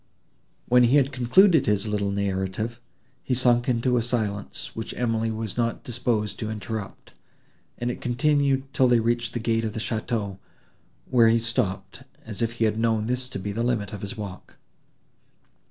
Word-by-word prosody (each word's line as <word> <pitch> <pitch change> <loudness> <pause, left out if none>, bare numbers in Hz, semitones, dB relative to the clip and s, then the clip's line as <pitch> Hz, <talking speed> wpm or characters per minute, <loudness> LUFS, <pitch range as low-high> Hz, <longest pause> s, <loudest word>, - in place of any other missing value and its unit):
When 125 0 +5
he 120 +4 +4
had 140 -1 +4
concluded 150 +6 +4
his 105 -1 +1
little 105 -2 -1
narrative, 100 +4 -2 0.4
he 125 - -1
sunk 120 0 +3
into 125 +1 +2
a - - +2
silence, 110 -4 -2
which 110 - -5
Emily 115 -2 0
was 110 -1 -4
not 115 -1 -1
disposed 120 -4 -1
to 110 - -3
interrupt, 110 -1 -6 0.6
and 120 0 -2
it - - -8
continued, 140 +1 +2
till 130 - +4
they 120 -1 +4
reached 120 0 0
the 120 - -2
gate 115 0 0
of 110 -1 -3
the 110 - -4
château, 110 -3 -3 0.7
when 120 -3 +4
he 115 - +4
stopped, 115 -4 -2 0.2
as 110 -2 -7
if 115 0 0
he 115 -1 0
had 110 0 0
known 110 -2 +1
this 125 +2 -2
to - - -5
be 100 +2 -4
the 110 +3 -2
limit 115 -5 -1
of 100 - -6
his 100 +4 -6
walk. 100 -3 -8
115 Hz, 175 wpm, -25 LUFS, 105-125 Hz, 0.7 s, When